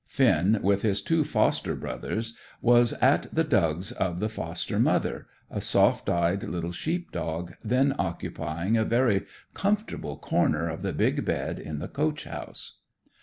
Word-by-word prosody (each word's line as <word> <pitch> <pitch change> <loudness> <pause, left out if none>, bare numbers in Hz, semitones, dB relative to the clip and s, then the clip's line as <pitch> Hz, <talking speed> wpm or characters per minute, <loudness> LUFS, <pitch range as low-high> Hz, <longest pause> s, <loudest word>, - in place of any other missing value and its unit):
Finn, 100 +7 +3
with 100 0 +3
his 105 -3 +1
two 165 -1 +1
foster - - +1
brothers, 115 +1 -4 0.2
was 120 0 +5
at 135 +3 +3
the 165 - +2
dugs 95 - +1
of 90 -2 -2
the 105 +2 0
foster 110 - -3
mother, - - +1 0.2
a - - -3
soft - - +3
eyed 85 +3 +1
little 85 -1 -3
sheep 170 - -3
dog, 85 +1 -4
then 130 +5 +2
occupying 85 +7 -2
a 110 - +3
very 115 -4 +2 0.3
comfortable 200 - -1
corner 80 +2 +1
of 80 0 -4
the - - -1
big - - +1
bed - - -2
in 75 0 -5
the 75 - -4
coach 155 +1 -1
house. - - -6
105 Hz, 155 wpm, -27 LUFS, 85-130 Hz, 0.3 s, was